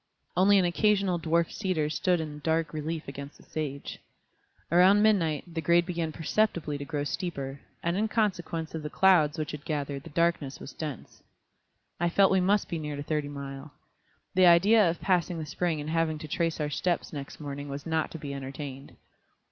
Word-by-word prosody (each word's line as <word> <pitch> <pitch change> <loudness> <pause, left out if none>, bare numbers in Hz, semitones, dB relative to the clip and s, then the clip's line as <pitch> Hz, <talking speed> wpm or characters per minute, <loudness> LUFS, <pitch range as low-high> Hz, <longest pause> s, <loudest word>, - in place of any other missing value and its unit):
Only 200 +2 +5
an 185 - +4
occasional 195 0 +2
dwarf 165 +1 +1
cedar 185 -7 -1
stood 175 +3 +1
in 150 -2 -5
dark 160 +2 0
relief 155 +1 -4
against 140 +1 -8
the - - -18
sage. 140 -3 -5 0.7
About 180 +3 +7
midnight 175 -6 +2
the 165 - -2
grade 170 +1 +4
began 170 -3 -2
perceptibly 160 -3 0
to 140 - -5
grow 145 -1 -2
steeper, 140 -4 -4 0.2
and 170 +1 0
in 215 +3 +1
consequence 175 -7 -1
of 160 - -4
the 150 - -5
clouds 170 -5 +4
which 155 -1 -3
had 150 -1 -7
gathered 145 -3 -3
the 165 - -11
darkness 165 -3 0
was - - -9
dense. 150 -6 -7 0.8
I 175 +1 +2
felt 195 +3 +4
we 190 -1 +4
must 200 +3 +2
be 170 - -3
near 150 -1 -4
to 145 - -5
Thirty 150 -1 -2
Mile. 140 0 -7 0.6
The 185 -1 +6
idea 195 +3 +6
of 165 - -4
passing 180 -2 +1
the 160 - -4
spring 165 +1 -1
and 150 +1 -4
having 165 -1 +1
to 155 - -8
trace 165 +2 -1
our 150 -1 -1
steps 175 +3 -1
next 140 -2 -7
morning 145 -1 -6
was 140 0 -6
not 160 -1 0
to - - -7
be 145 -2 -6
entertained. 135 0 -7
160 Hz, 190 wpm, -28 LUFS, 145-175 Hz, 0.8 s, About